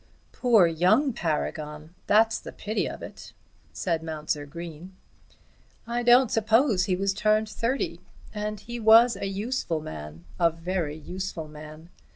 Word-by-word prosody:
"Poor 230 -7 +4
young 185 - +3
Paragon! 155 -2 -3
that's 220 +1 +4
the - - -9
pity 215 +2 -2
of - - -8
it," - - -10 0.4
said 165 -3 -2
Mounser 155 -2 -4
Green. 170 +4 -9 0.9
"I 235 +1 -2
don't 245 0 +5
suppose 225 -2 +3
he 185 - +1
was 195 +1 0
turned 215 +1 +2
thirty, 230 +5 -2 0.3
and 210 0 -4
he 240 +3 -7
was 225 +1 +6
a 195 - -4
useful 200 -3 -2
man, 80 - -9
a 170 -1 +5
very 165 -2 -3
useful 180 0 -6
man. 155 +2 -12
190 Hz, 140 wpm, -26 LUFS, 160-220 Hz, 0.9 s, was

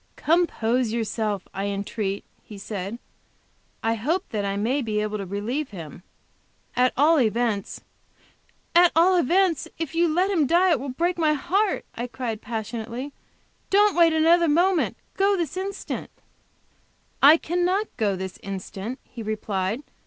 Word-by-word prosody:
"Compose 255 -8 +1
yourself, 215 -3 -2
I 195 +1 -3
entreat," 200 0 -3 0.2
he 210 - -11
said; 200 +1 -5 0.9
"I 225 0 +2
hope 315 - -1
that 215 -5 -2
I 200 0 -2
may 245 +8 0
be 215 -3 -1
able 215 0 -2
to 195 - -5
relieve 230 +10 -3
him. 165 -4 -9 0.7
At 250 +1 +3
all 305 +3 +5
events 225 -3 -1 0.5
" - - -38
"At 355 - +5
all 355 +3 +5
events, 350 0 +2
if 325 -2 -4
you 340 +1 +3
let 365 +5 +2
him 320 -7 +2
die 350 +4 +4
it 310 - +3
will 275 +2 -5
break 345 +7 -1
my 310 -2 +3
heart," 385 +8 0
I 240 +1 -4
cried 235 -3 -4
passionately. 235 +4 -5 0.6
"Don't 410 +1 +4
wait 335 -1 +5
another 330 +2 +4
moment; 345 +3 +2 0.2
go 395 0 +3
this 335 -4 -2
instant." 385 +1 -4 1.1
"I 295 +4 +8
cannot 355 +5 0
go 210 -5 0
this 190 0 -6
instant," 195 +4 -6
he 245 -2 -10
replied. 215 0 -2
255 Hz, 150 wpm, -24 LUFS, 215-335 Hz, 1.1 s, I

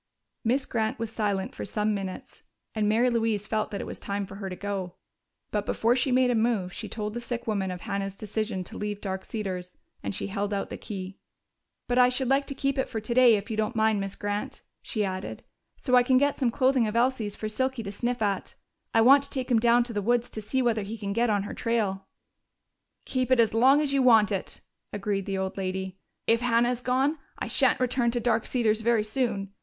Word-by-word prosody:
Miss 260 +4 +1
Grant 220 -2 -1
was 225 -1 -4
silent 205 -4 -1
for - - -6
some 210 0 0
minutes, 195 -2 -6 0.3
and 210 -1 +1
Mary 235 +4 +3
Louise 225 -3 0
felt 215 -1 -1
that 200 - -4
it - - -5
was - - -7
time 200 0 -3
for 195 0 -10
her 195 -1 -5
to 185 - -5
go. 190 -2 -4 0.6
But 210 -1 0
before 235 +2 +2
she 260 +1 +1
made 250 0 +4
a - - +2
move, 220 -6 +1
she - - -6
told 210 -1 -4
the 240 - -4
sick 240 0 -4
woman 200 -4 -1
of 180 -1 -5
Hannah's 200 -2 -3
decision 210 -2 -3
to - - -9
leave 210 -1 -3
Dark 190 -2 -4
Cedars, 185 -4 -5 0.2
and - - -3
she - - -2
held 205 +1 -2
out 200 - -3
the - - -3
key. 190 -2 -7 0.7
"But 245 +1 +2
I 250 0 +7
should 255 +1 0
like 275 +1 +2
to 275 - -5
keep 275 0 -1
it - - 0
today, 240 0 +5
if 205 +2 -4
you 215 - -3
don't 220 +2 -1
mind, 220 -1 +2
Miss 195 0 -4
Grant," 205 0 -4 0.2
she 215 -4 -2
added, 185 0 -5 0.4
"so 255 - -2
I 250 - +8
can 255 +1 +3
get 285 +1 +2
some 255 -4 +1
clothing 255 -1 +2
of 210 - -4
Elsie's 235 -4 +1
for 215 - -4
Silky 260 +2 -1
to 200 - -5
sniff 240 +3 -2
at. 200 -2 -2 0.4
I 225 - +6
want 270 +5 +7
to - - -11
take 260 -2 -3
him 235 - +5
down 235 +1 +4
to 235 -1 -6
the 205 - -1
woods 240 +3 +1
to 215 - -5
see 255 +5 0
whether 230 -3 +1
he 210 +3 -6
can 200 -2 -3
get 235 +2 +2
on 205 -2 +1
her 205 - -6
trail." 205 -5 -1 1.0
"Keep 255 -2 -1
it 255 -2 +4
as 225 -2 +4
long 260 +5 +5
as 285 -2 0
you 275 - +3
want 225 -5 +6
it," 195 -2 -3 0.3
agreed 200 -1 -2
the 195 -1 -1
old 190 0 -3
lady. 190 0 -3 0.3
"If 230 +1 +3
Hannah 240 0 +3
is 250 -1 -3
gone, 270 +5 +1 0.2
I - - -3
shan't - - +2
return 250 -1 +1
to 240 +1 -1
Dark 230 -1 +1
Cedars 225 -3 +1
very 230 -1 +2
soon. 215 -4 -2
220 Hz, 230 wpm, -27 LUFS, 200-245 Hz, 1.0 s, I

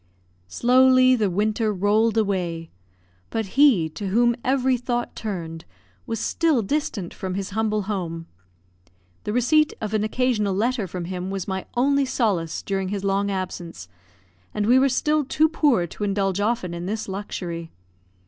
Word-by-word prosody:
Slowly 255 - +5
the 215 -5 +1
winter 215 +4 0
rolled 210 +3 +2
away; 180 -6 -1 0.6
but 225 -1 -2
he 265 - +5
to 200 +6 -6
whom 235 +4 +3
every 260 0 +2
thought 240 0 -3
turned 170 -6 -5 0.4
was 225 -1 -3
still 310 -2 +1
distant 205 - -2
from 185 -1 -5
his 195 0 -4
humble 215 0 0
home. 175 -5 -4 1.0
The 210 - -2
receipt 305 +6 +3
of 215 -1 -4
an 215 -1 +1
occasional 215 -3 0
letter 225 0 0
from 175 0 -5
him 180 +1 -4
was 195 -2 -4
my 190 -1 -4
only 280 +2 +3
solace 200 -11 -1
during 195 -1 -2
his 200 -1 -3
long 200 +1 +1
absence, 185 -3 -5 0.7
and 210 - 0
we 250 +4 +5
were 275 +1 +4
still 300 +4 +1
too 305 +4 +2
poor 290 - +2
to 175 - -7
indulge 195 -1 0
often 205 -4 -1
in 170 +1 -5
this 215 +2 -3
luxury. 180 -4 -5
210 Hz, 155 wpm, -23 LUFS, 190-245 Hz, 1.0 s, Slowly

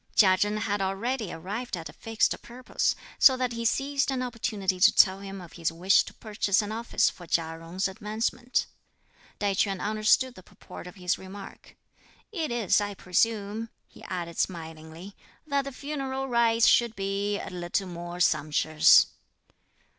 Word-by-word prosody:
Chia 190 -3 +6
Chen 205 +2 0
had 205 -2 -1
already 205 +3 -2
arrived 200 +6 -5
at 165 - -7
a - - -12
fixed 225 -1 0
purpose, 250 +2 -2 0.2
so 260 -3 +7
that 255 -1 -1
he 230 0 -4
seized 275 +4 +1
an 260 -2 -1
opportunity 215 -6 -2
to 205 +3 +7
tell 190 0 +5
him 195 0 -8
of 175 -3 -12
his 165 -1 -1
wish 180 +4 +4
to - - -10
purchase 205 -2 0
an 205 - -5
office 230 +2 +1
for 175 - -5
Chia 165 0 -1
Jung's 175 +4 -2
advancement. 220 +5 -2 0.7
Tai 205 -1 +1
Ch'üan 195 0 0
understood 215 +5 +2
the 185 - -13
purport 180 - -12
of 180 - -11
his 180 -2 -1
remark. 195 +1 -11 0.5
"It 330 -7 -2
is, 230 -4 +2
I 205 -1 -3
presume," 210 +4 0 0.2
he - - -17
added 170 -2 -5
smilingly, 165 +2 -5 0.3
"that 280 -2 0
the 275 - -5
funeral 270 -1 -4
rites 235 -2 +3
should 235 -2 +4
be 200 +1 -2
a - - -7
little 180 +2 -2
more 175 0 -7
sumptuous." 155 -2 +5
205 Hz, 160 wpm, -27 LUFS, 180-235 Hz, 0.7 s, so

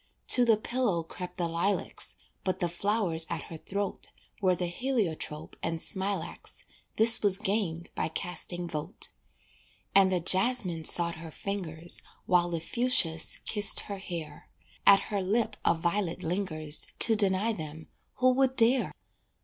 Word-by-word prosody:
To 245 - +8
the 225 -2 +4
pillow 215 -6 -1
crept 180 +2 -9
the 175 -2 -1
lilacs, 170 +5 -2 0.3
But 185 - -2
the 175 - 0
flowers 175 -2 +1
at - - -4
her 165 - -6
throat 200 +4 -4 0.3
Were 185 -2 +3
the 180 - -2
heliotrope 175 - -3
and 165 0 -2
smilax 195 +2 -4 0.3
This 225 +1 +3
was 200 -2 +3
gained 195 -5 -2
by - - -2
casting 175 +1 -4
vote 160 +4 -4 0.8
And 195 -1 +5
the 185 - +1
jasmine 185 -2 +1
sought 170 0 +4
her 165 0 -9
fingers, 175 -2 -1 0.2
While 175 -1 +3
the 170 -1 -2
fuschias 165 -5 +2
kissed 210 -2 +6
her 200 -1 -7
hair; 165 -6 -8 0.4
At 195 - +8
her 200 -2 0
lip 215 +3 0
a - - +3
violet 170 +2 -2
lingers 160 -4 +1
To 225 - +5
deny 205 +2 +1
them, 160 -3 -8 0.3
who 255 0 +3
would 265 0 +1
dare? 250 +2 +3
185 Hz, 145 wpm, -28 LUFS, 165-210 Hz, 0.8 s, To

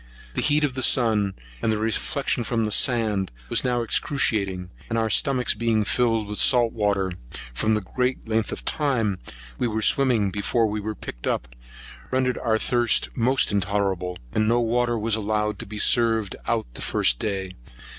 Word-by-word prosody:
The - - -1
heat 150 +1 +2
of 145 -3 0
the 130 - -3
sun, 110 -6 +2 0.3
and 110 - +1
the 110 - 0
reflection 120 +4 -1
from 115 0 -1
the 105 - -3
sand, 110 -5 +2 0.2
was - - +1
now 120 -1 0
excruciating; 100 -7 0 0.2
and 115 - -1
our 110 -1 0
stomachs 130 +2 +2
being 110 -1 +1
filled 115 -2 +1
with 105 0 -5
salt 120 -3 +4
water, 100 -3 0 0.4
from 110 - +1
the 110 - -1
great 125 +6 -2
length 110 0 0
of - - -6
time 115 - 0 0.4
we - - +1
were 110 -1 -2
swimming 120 -8 +3
before 105 +4 0
we 105 0 -2
were 110 +1 -4
picked - - -8
up, 60 - -1 0.6
rendered 130 -1 0
our 110 -2 +1
thirst 120 0 +2
most 130 +2 +2
intolerable; 95 -2 -1 0.2
and 110 0 +1
no 120 +2 +3
water 120 0 +1
was 110 +1 0
allowed 105 0 -1
to 115 - -7
be 105 +1 -7
served 115 -2 +3
out - - 0
the - - -8
first 60 -1 +2
day. 95 -3 -3
110 Hz, 175 wpm, -24 LUFS, 105-120 Hz, 0.6 s, salt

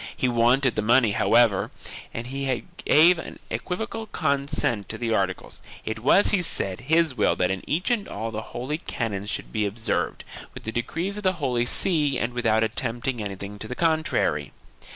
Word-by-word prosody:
He 130 - +1
wanted 120 +2 +3
the - - +1
money, 115 +1 +4
however, 110 -1 +3 0.4
and 115 - -5
he 135 -1 -2 0.2
gave 165 +3 +6
an - - -8
equivocal 220 +4 -4
consent 140 - -1
to 110 - -4
the 115 0 -1
articles; 95 -3 -2 0.2
it 110 0 -3
was, 140 - +5
he 200 - +3
said, 95 - -3
his 160 -2 +4
will - - +2
that 90 0 +1
in 95 -1 -3
each 175 +9 0
and 230 -4 0
all 115 +2 -4
the 110 0 -4 0.2
holy 140 +6 -3
canons 105 - -3
should - - -4
be 110 -2 0
observed, 110 +3 -2 0.3
with - - -9
the 110 - -4
decrees 165 - -2
of 210 - -6
the 185 -1 +3
Holy 125 -7 0
See 150 -3 +2
and 120 +1 -2
without 115 -2 +2
attempting 120 +2 -1
anything 100 0 -6
to 110 - -5
the 125 - -5
contrary. 155 - +1
120 Hz, 180 wpm, -25 LUFS, 110-155 Hz, 0.4 s, gave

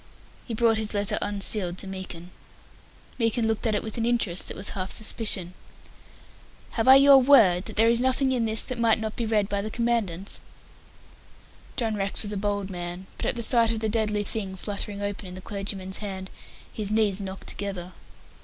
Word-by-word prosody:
He 230 - -3
brought 225 -1 +3
his 215 -1 0
letter 205 -1 +1
unsealed 200 -3 0
to - - -2
Meekin. 185 -2 -7 0.9
Meekin 230 0 +1
looked 225 +1 -1
at 215 - +1
it - - -1
with 220 +1 -4
an 225 - 0
interest 230 -7 0
that - - -7
was 200 - -3
half 185 -1 -4
suspicion. 210 -5 +1 1.2
"Have 225 +1 -1
I 265 - +10
your 275 0 +8
word 225 -10 +5
that - - -6
there 225 +2 +4
is 235 +1 +3
nothing 260 +1 +2
in 245 -3 +1
this 220 0 +1
that 255 -2 -5
might 230 -1 +3
not 220 -1 -4
be 235 - -2
read 210 -2 +1
by 200 0 -1
the 215 - -4
Commandant?" 215 -6 -1 1.4
John 225 -4 -1
Rex 195 +1 0
was 210 0 0
a - - -3
bold 200 -1 -2
man, 175 +1 -5
but - - -3
at - - 0
the 235 - -1
sight 230 -1 +5
of 225 - -2
the 220 0 -1
deadly 210 -1 0
thing 195 -2 -2
fluttering 205 +1 -5
open 200 -1 -4
in 180 - -8
the - - -7
clergyman's 195 -1 -5
hand, 190 -2 -6 0.4
his 210 -2 -3
knees 210 -2 +1
knocked 190 -1 -7
together. 190 -3 -5
210 Hz, 195 wpm, -26 LUFS, 195-225 Hz, 1.4 s, I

